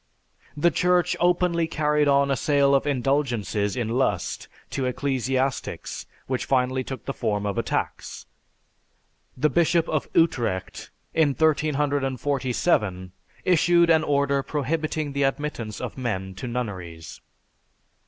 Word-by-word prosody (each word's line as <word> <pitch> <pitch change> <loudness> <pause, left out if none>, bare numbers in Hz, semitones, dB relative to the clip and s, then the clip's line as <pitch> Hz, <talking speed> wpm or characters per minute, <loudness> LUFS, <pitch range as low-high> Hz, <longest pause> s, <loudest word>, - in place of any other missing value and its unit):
The 170 +4 +3
Church 180 +1 +2
openly 175 -1 +2
carried 150 -1 +1
on 140 0 +3
a - - +3
sale 140 +1 +2
of 140 +1 +2
indulgences 120 -7 0
in 120 -3 -1
lust 125 +4 -1 0.2
to 135 -2 -1
ecclesiastics 130 0 -2 0.2
which 130 -1 -2
finally 130 0 +1
took 135 0 -7
the 135 - -3
form 105 -4 -1
of 100 -1 -1
a - - +1
tax. - - -4 1.1
The 150 +3 +2
Bishop 170 +2 +2
of 155 -2 -2
Utrecht 120 - 0 0.2
in 150 -4 +2
1347 140 - 0 0.3
issued 170 -1 +4
an 160 -1 +4
order 140 -1 +1
prohibiting 150 +1 -2
the 140 - -1
admittance 135 -6 -2
of - - -6
men 95 -6 -3
to 110 +7 -6
nunneries. 90 - -6
140 Hz, 125 wpm, -25 LUFS, 120-150 Hz, 1.1 s, issued